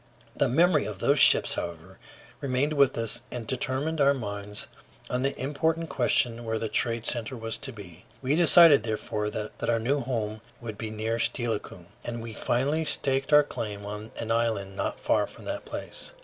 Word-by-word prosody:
The - - +2
memory 170 +8 +3
of 105 -3 -5
those 140 +8 +2
ships, - - +6
however, 85 +2 -6 0.4
remained 140 +2 0
with 140 -3 +3
us 115 +1 -1
and 120 -2 -6
determined 135 +5 -1
our 140 0 +5
minds 105 -3 -5 0.5
on 125 - 0
the 135 +1 -1
important 160 +4 -1
question 120 -2 +1
where 110 -1 -2
the 110 0 -3
trade 115 +1 0
center 120 +1 -1
was 115 0 -3
to 135 - -4
be. 95 -6 -12
We 135 +3 0
decided 165 -4 +7
therefore 105 -1 -2
that 105 0 -5 0.2
our 115 - +3
new 135 +6 +1
home 110 -4 -3 0.2
should 110 -3 -6
be 110 - -3
near 110 +2 -2
Steilacoom, 115 -2 -2 0.2
and 120 -1 -5
we 115 -1 -7
finally 140 +9 0
staked 135 -2 0
out 150 - +9
a - - -3
claim 105 -7 -6
on 105 +2 -6
an 115 0 -3
island 110 -4 0
not - - -3
far - - +1
from - - -14
that - - -4
place. - - -7
115 Hz, 185 wpm, -27 LUFS, 110-135 Hz, 0.5 s, out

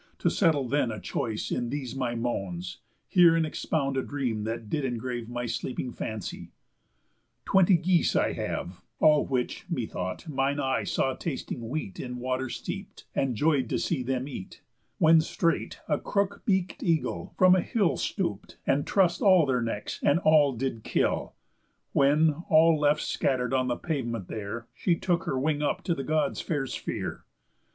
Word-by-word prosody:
To - - +1
settle 155 -8 +2
then 140 -1 +1
a 110 - -5
choice 110 -2 -3
in 120 -1 -1
these 135 -3 -4
my 125 -3 -1
moans, 95 -7 -3 0.3
Hear 175 -2 +6
and 165 -1 +2
expound 140 -3 -1
a - - +2
dream 125 -7 -2
that 115 0 -4
did 145 +7 -1
engrave 120 -2 -3
My 120 0 -3
sleeping 120 +2 -3
fancy: 110 -4 -6 1.0
Twenty 190 -1 +5
geese 175 0 +2
I - - +2
have, 90 0 -4 0.2
All 150 -1 +5
which, 130 +4 -2
me 130 -10 -1
thought, 95 - -5
mine 140 -1 0
eye 135 -1 0
saw 135 - 0
tasting 130 -6 -5
wheat 130 -9 -4
In 125 -1 -5
water 130 +1 -2
steep'd, - - -6
and 135 -3 0
joy'd 140 -2 +2
to - - 0
see 150 -6 -1
them 130 +1 -2
eat; 115 -9 -9 0.3
When 160 0 +6
straight 165 +1 -1
a 150 -2 +1
crook 200 0 -1
beak'd 190 -3 0
eagle 165 -3 -1
from 185 -1 +7
a 185 - +3
hill 205 -5 +1
Stoop'd, 105 - -3
and 140 +1 +1
truss'd 180 -3 +2
all 185 -6 +6
their 130 -3 +1
necks, 115 -3 -3
and 145 - +4
all 150 -4 +5
did 120 -2 -3
kill; - - 0 0.6
When, 150 +3 +3
all 160 +1 +6
left 150 0 +3
scatter'd 125 -2 0
on 130 -1 +2
the 120 - -1
pavement 120 - -3
there, 110 +2 -5
She 175 - +1
took 175 +1 0
her 135 -7 -1
wing 150 +2 0
up 145 - -1
to 170 - +1
the 135 - -4
Gods' 150 -2 0
fair 145 -4 -1
sphere. - - -4
135 Hz, 170 wpm, -28 LUFS, 120-160 Hz, 1.0 s, from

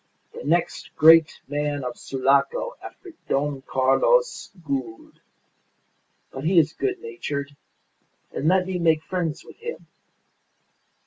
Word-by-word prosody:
The - - -8
next 170 +3 -1
great 160 0 +6
man 145 0 -2
of 125 -1 -4
Sulaco 140 - 0
after 370 - -11 0.2
Don 140 -1 -1
Carlos 135 - +2 0.2
Gould. 130 -6 -5 1.1
But 135 - -7
he 175 +3 +2
is 160 -1 +4
good 390 -2 -2
natured, 145 - -5 0.8
and 150 - -2
let 185 +1 +3
me 185 -1 -3
make 160 -2 +2
friends 170 -4 -3
with - - -14
him." 470 +1 -7
155 Hz, 120 wpm, -24 LUFS, 140-185 Hz, 1.1 s, great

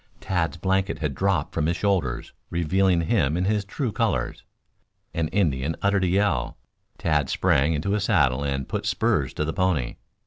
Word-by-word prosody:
Tad's 85 -5 -1
blanket 95 +2 0
had 75 -4 -2
dropped 95 -3 0
from 80 -2 0
his 85 +1 0
shoulders, 90 -13 -1 0.2
revealing 90 +1 +2
him 80 -4 +1
in 90 - 0
his 105 0 +1
true 115 +5 -3
colors. 95 - -1 0.7
An 80 -1 0
Indian 80 -6 0
uttered 100 -1 +2
a - - +2
yell. 90 -9 +1 0.4
Tad 75 -5 +1
sprang 75 +4 +2
into 80 +7 -1
his 105 -1 +1
saddle 70 - +2
and 70 -2 -2
put - - -3
spurs 70 -4 +1
to 75 - -1
the 80 - -2
pony. 90 -10 0
85 Hz, 170 wpm, -25 LUFS, 75-95 Hz, 0.7 s, revealing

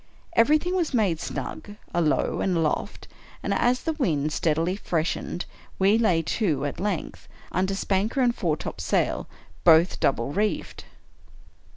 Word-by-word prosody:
Everything 305 +9 +3
was 335 -7 0
made 195 -8 +2
snug, 205 +4 -6 0.2
alow 165 -3 +1
and 185 -3 +1
aloft; 160 -2 -2 0.4
and - - 0
as 245 +1 +1
the 325 - 0
wind 155 - 0
steadily 165 +3 +1
freshened, 175 -2 -2 0.3
we 195 +2 +4
lay 175 -8 +2
to, 160 -5 0
at 145 - -4
length, 195 -3 -3 0.2
under 190 +2 0
spanker 200 +6 0
and 245 -2 +3
foretopsail, 160 -4 -1 0.4
both 165 +1 +5
double 130 -1 +1
reefed. 210 +3 -2
185 Hz, 130 wpm, -25 LUFS, 160-220 Hz, 0.4 s, both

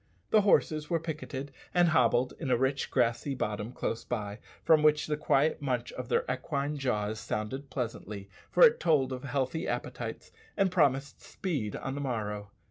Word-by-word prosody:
The 215 - +6
horses 155 -6 +2
were 170 - +2
picketed 145 -4 -5 0.2
and 175 -1 +5
hobbled 125 -3 +3
in 145 - -3
a 125 - +4
rich 135 +2 0
grassy 125 +3 +1
bottom 105 -1 -3
close 115 - -3
by, 105 -3 -4 0.2
from 160 -2 +5
which 150 0 +4
the 150 - -1
quiet 150 +1 +2
munch 125 -4 -1
of 125 -1 -7
their - - +2
equine 140 +3 -2
jaws 110 -5 -1
sounded 130 +6 -4
pleasantly, 105 -5 -5 0.2
for - - +5
it 475 0 +4
told 135 -5 +2
of 125 - -6
healthy 140 +5 -1
appetites, - - -4 0.3
and 195 -2 +3
promised 140 -5 +1
speed 145 - -3
on 135 - -4
the 140 - -4
morrow. 105 -6 -3
135 Hz, 170 wpm, -30 LUFS, 120-150 Hz, 0.3 s, The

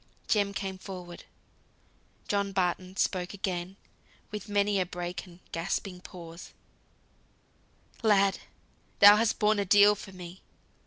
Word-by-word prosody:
Jem 205 -2 +2
came 190 -1 -5
forward. 180 -3 -9 1.0
John 200 -1 0
Barton 185 0 -1
spoke 180 +1 -1
again, 185 -1 -3 0.6
with 210 +1 -6
many 205 -1 +2
a 185 - +1
break 175 +1 -5
and 175 0 -15
gasping 180 +2 -3
pause, 170 -2 -11 1.5
"Lad! 200 -3 +3 0.6
thou 205 +1 +9
hast 225 0 +1
borne 215 -1 +2
a - - +2
deal 205 +2 +7
for 205 -1 -10
me. 180 0 -10
195 Hz, 120 wpm, -29 LUFS, 180-205 Hz, 1.5 s, thou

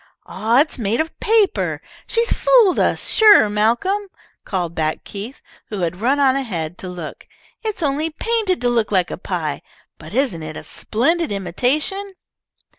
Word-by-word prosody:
"Aw, 230 +5 +2
it's 305 -3 -2
made 220 0 0
of 320 +1 -3
paper! 435 -2 +2 0.3
She 465 0 +1
fooled 475 -5 +4
us, - - +1
sure, 420 - +6
Malcolm," 240 - +1 0.4
called 175 -4 -2
back 155 -1 -2
Keith, 210 +7 -8 0.3
who 205 -3 -4
had 180 +2 -2
run 270 +5 +2
on 270 -2 +4
ahead 175 -12 -3
to 185 - -6
look. 175 -4 -8 0.3
"It 435 -3 -2
is - - -5
only 295 +2 0
painted 420 - -1
to 245 - +2
look 230 -3 0
like 185 -3 +1
a - - -4
pie. 165 -6 -3 0.4
But 160 +6 -10
isn't 255 -11 0
it 155 0 -6
a - - -7
splendid 320 +8 0
imitation?" 265 - -1
245 Hz, 165 wpm, -20 LUFS, -, 0.4 s, sure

